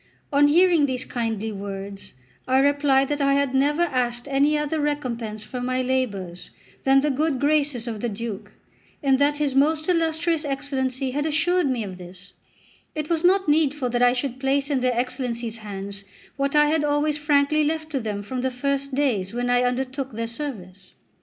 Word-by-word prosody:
On 290 +1 +5
hearing 335 -1 +4
these 255 -1 -3
kindly 225 -2 -3
words 200 0 -7 0.3
I 260 +1 +3
replied 275 -1 +3
that 290 0 -1
I 275 0 +3
had 280 -2 +1
never 290 +5 +2
asked 245 -5 -1
any 285 +2 +2
other 300 +1 -1
recompense 240 -8 -3
for 250 +2 -6
my 255 +1 -1
labours 200 -9 -2 0.4
than 270 0 +5
the 295 +1 +1
good 290 0 0
graces 285 -4 +1
of 225 -2 -4
the 240 - -2
Duke, 215 -1 -6 0.5
and 270 -1 +3
that 290 +1 +2
his 290 -2 0
most 310 +3 +2
illustrious 330 -2 +1
Excellency 270 -2 -2
had 290 +3 -1
assured 335 +1 +2
me 245 -4 -1
of 185 -3 -8
this; 180 +2 -11 0.6
it 305 +1 -3
was 325 0 +1
not 380 +1 +4
needful 295 -4 +2
that 240 0 0
I 245 0 +5
should 255 0 -3
place 275 +1 0
in 275 - +2
their 250 -1 0
Excellencies' 240 -2 -2
hands 200 -2 -5 0.3
what 275 +1 -1
I 295 0 +6
had 300 0 +1
always 295 +1 +1
frankly 295 +1 +2
left 315 +1 -2
to 275 - 0
them 210 -3 -4
from 250 +5 -4
the 260 - 0
first 275 +1 -2
days 235 -8 0
when 245 0 0
I 245 0 +4
undertook 260 +1 -2
their 230 +1 -3
service. 205 -8 -7
270 Hz, 185 wpm, -24 LUFS, 240-295 Hz, 0.6 s, I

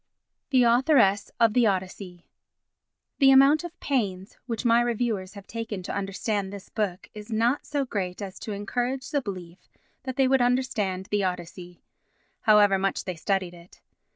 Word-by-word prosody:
The 255 -2 +4
Authoress 235 -5 +3
of 230 -2 +4
the 240 -1 +4
Odyssey 185 -2 -4 0.9
The 270 -2 +6
amount 275 +4 +6
of 345 0 -9
pains 200 -8 -2
which 230 0 -4
my 235 0 +5
reviewers 225 -5 -2
have 200 -1 -10
taken 225 -4 -5
to - - -5
understand 200 0 -2
this 200 -1 -10
book 195 -5 -3
is 210 +2 -10
not 235 +5 0
so 285 -2 -1
great 185 -7 -4
as 195 -2 -7
to 220 - -6
encourage 245 +6 -3
the 285 - +1
belief 185 -5 -8 0.4
that 260 -1 -5
they 270 -1 +3
would 265 0 +3
understand 230 -7 0
the 205 -1 +1
Odyssey, 180 -1 -5 0.6
however 205 -3 +4
much 195 0 -1
they 185 - -5
studied 185 +1 -1
it. 175 +1 -16
210 Hz, 160 wpm, -26 LUFS, 190-245 Hz, 0.9 s, The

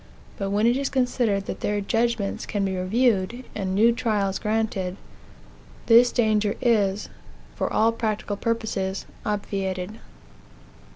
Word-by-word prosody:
But 195 -1 -1
when 205 +2 +2
it 240 +2 +4
is 275 0 -1
considered 245 -6 +1
that - - -5
their 205 0 -1
judgments 225 0 -1
can 200 -2 -1
be 190 -1 -1
reviewed, 225 +4 +1
and 190 -2 -2
new 225 +4 +5
trials 215 -5 0
granted, 210 -4 -1 0.9
this 240 +1 +6
danger 215 -3 +2
is, 210 -5 +2 0.5
for - - -2
all 225 +1 +3
practical 215 -2 -2
purposes, 210 -4 -2 0.2
obviated. 200 -1 -3
210 Hz, 125 wpm, -24 LUFS, 195-230 Hz, 0.9 s, this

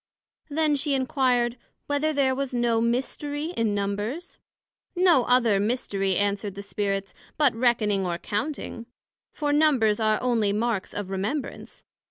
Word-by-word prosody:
Then 305 0 +2
she 280 0 0
inquired, 255 -2 +1 0.3
Whether 290 +2 0
there 275 -3 +2
was 265 -1 -3
no 235 -2 +2
mystery 290 +6 -2
in 220 -3 0
Numbers? 205 - -3 0.6
No 350 -8 +4
other 235 -5 +3
mystery, 200 -3 0
answered 200 0 -1
the 200 - -7
Spirits, 200 -1 -2 0.2
but 290 -5 +4
reckoning 225 -4 +1
or 170 -1 -2
counting; 235 - -4 0.4
for 290 -1 -1
Numbers 270 -9 +3
are 215 -1 +2
onely 230 -5 +1
marks 220 -2 -1
of 205 -2 -4
remembrance. 215 +10 -4
240 Hz, 135 wpm, -25 LUFS, 205-280 Hz, 0.6 s, No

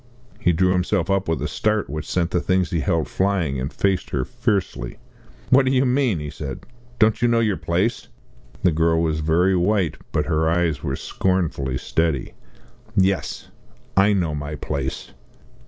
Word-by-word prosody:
He 90 - +3
drew 90 +2 +2
himself 90 0 +1
up 95 0 +1
with 80 -1 -1
a - - 0
start 105 -1 0
which 75 0 -5
sent 90 -1 0
the 90 - +1
things 95 -1 +1
he 85 - 0
held 85 -3 0
flying, 90 -9 0
and 65 +4 -3
faced 95 -2 0
her 65 -3 -1
fiercely. 95 - -2 0.5
"What 130 +1 +7
do 130 - +1
you 135 0 +3
mean?" 125 -6 +2
he 75 -1 -5
said, 70 -4 -6 0.4
"don't 110 -1 +3
you 120 - +4
know 115 -1 +3
your 110 -4 +2
place?" 95 +9 -1 0.6
The 90 - +5
girl 80 +1 +2
was 80 -1 0
very 85 +5 +2
white, 90 -1 +1
but 75 - 0
her 80 -1 +1
eyes 85 -3 +1
were - - -2
scornfully 80 -8 -1
steady. 80 -1 -1 0.6
"Yes 95 0 0 0.5
I 100 +2 +5
know 85 -6 0
my 75 +1 -4
place!" 70 -3 -4
90 Hz, 170 wpm, -22 LUFS, 80-100 Hz, 0.6 s, What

